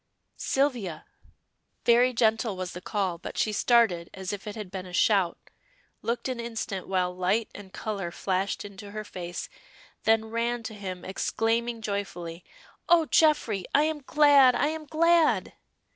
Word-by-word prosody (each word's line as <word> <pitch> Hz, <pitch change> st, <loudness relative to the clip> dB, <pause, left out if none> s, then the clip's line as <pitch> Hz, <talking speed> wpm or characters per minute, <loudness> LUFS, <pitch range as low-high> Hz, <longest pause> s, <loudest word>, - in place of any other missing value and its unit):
"Sylvia!" 245 Hz, -, -1 dB, 0.8 s
Very 240 Hz, +2 st, +5 dB
gentle 225 Hz, -3 st, +1 dB
was 185 Hz, -1 st, -4 dB
the 180 Hz, -, -8 dB
call, 185 Hz, -4 st, -2 dB
but -, -, -8 dB
she 215 Hz, -, +1 dB
started 210 Hz, -7 st, +3 dB
as 190 Hz, 0 st, -4 dB
if 205 Hz, +1 st, -7 dB
it 210 Hz, -, -5 dB
had 210 Hz, -4 st, -7 dB
been 190 Hz, -1 st, -6 dB
a 180 Hz, -, -11 dB
shout, 190 Hz, -3 st, +3 dB, 0.6 s
looked 235 Hz, +3 st, -2 dB
an 255 Hz, -2 st, -3 dB
instant 225 Hz, -5 st, -4 dB
while 180 Hz, -1 st, 0 dB
light 190 Hz, +5 st, 0 dB
and 200 Hz, -2 st, -11 dB
color 200 Hz, -3 st, -4 dB
flashed 190 Hz, +3 st, -2 dB
into 200 Hz, 0 st, -10 dB
her 215 Hz, +1 st, -5 dB
face, 175 Hz, -3 st, -6 dB, 0.6 s
then 220 Hz, 0 st, +4 dB
ran 235 Hz, +1 st, -1 dB
to 220 Hz, 0 st, -6 dB
him 185 Hz, -4 st, -7 dB
exclaiming 225 Hz, +4 st, -1 dB
joyfully 180 Hz, -5 st, -4 dB, 0.5 s
"Oh, 335 Hz, -2 st, +6 dB
Geoffrey! 295 Hz, -, +3 dB
I 290 Hz, -, +6 dB
am 310 Hz, -1 st, -1 dB
glad! 280 Hz, -3 st, +6 dB
I 290 Hz, -, +2 dB
am 315 Hz, 0 st, -5 dB
glad!" 335 Hz, +1 st, +3 dB
215 Hz, 155 wpm, -27 LUFS, 190-240 Hz, 0.8 s, Oh